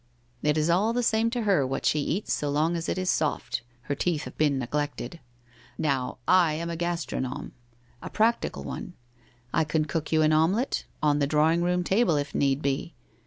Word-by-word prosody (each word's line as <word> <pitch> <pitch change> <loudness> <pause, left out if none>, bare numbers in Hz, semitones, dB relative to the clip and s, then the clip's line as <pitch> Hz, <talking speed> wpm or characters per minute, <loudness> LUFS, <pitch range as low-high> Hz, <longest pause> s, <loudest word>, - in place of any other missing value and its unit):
It 150 +1 +2
is 155 0 +2
all 195 +7 +2
the 245 +1 0
same 225 0 +2
to 240 0 -2
her 195 -9 +3
what 135 - -3
she 150 - +3
eats 175 +7 -1
so 145 - -1
long 155 +4 +1
as 170 0 -3
it - - -1
is 185 0 -2
soft 155 -4 0
— 120 - -35
her 140 - -2
teeth 155 +1 -1
have - - -9
been 145 -3 +2
neglected. 145 +3 -3 0.6
Now, 135 -4 -1
I 180 -4 +5
am 170 +2 -3
a - - -3
gastronome 170 -6 -3 0.3
— 120 0 -33
a - - -6
practical 230 +2 +1
one. - - -6 0.6
I - - +3
can 155 0 0
cook 155 +1 -3
you 160 -1 +4
an 155 0 +4
omelette 185 - +1
— - - -23
on 145 -1 +3
the 140 - +2
drawing 155 +3 +3
room 180 0 +1
table, 195 -1 +2
if 145 -1 -2
need 140 +1 +1
be. 140 +4 -2
155 Hz, 210 wpm, -27 LUFS, 145-180 Hz, 0.6 s, I